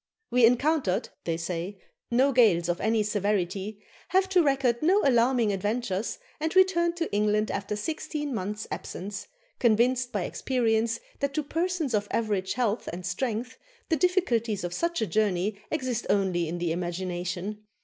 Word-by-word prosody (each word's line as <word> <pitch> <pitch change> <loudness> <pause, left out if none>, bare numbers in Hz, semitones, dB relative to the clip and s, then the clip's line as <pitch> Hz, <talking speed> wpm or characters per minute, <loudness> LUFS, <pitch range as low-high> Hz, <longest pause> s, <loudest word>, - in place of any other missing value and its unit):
"We 245 -2 +6
encountered," 250 - +1 0.2
they 165 -1 0
say, 175 +3 -4 0.3
"no 260 +4 +3
gales 210 -10 +4
of 175 - -1
any 220 0 +2
severity, 205 0 -1 0.2
have 380 0 +3
to 370 -2 +5
record 270 -5 +2
no 380 +6 +4
alarming 240 -4 +3
adventures, 205 +1 -2 0.2
and 320 +3 -2
returned 345 -2 +4
to 330 -8 -2
England 210 +1 +2
after 200 +1 -3
sixteen 295 +4 -3
months' 210 0 -3
absence, 195 +2 -5 0.3
convinced 245 +2 +3
by 205 -4 -1
experience 230 0 0 0.2
that 280 -1 -1
to 305 - 0
persons 330 -2 -1
of 205 -1 +1
average 205 -4 0
health 230 -2 -1
and 180 +1 -7
strength 240 +6 -3 0.3
the 325 - +3
difficulties 245 - +1
of 175 0 -3
such 340 - 0
a - - +1
journey 200 0 0
exist 255 -6 -2
only 185 -4 +2
in 175 - -3
the 175 -1 -1
imagination. 180 +3 -3
220 Hz, 150 wpm, -27 LUFS, 195-265 Hz, 0.3 s, We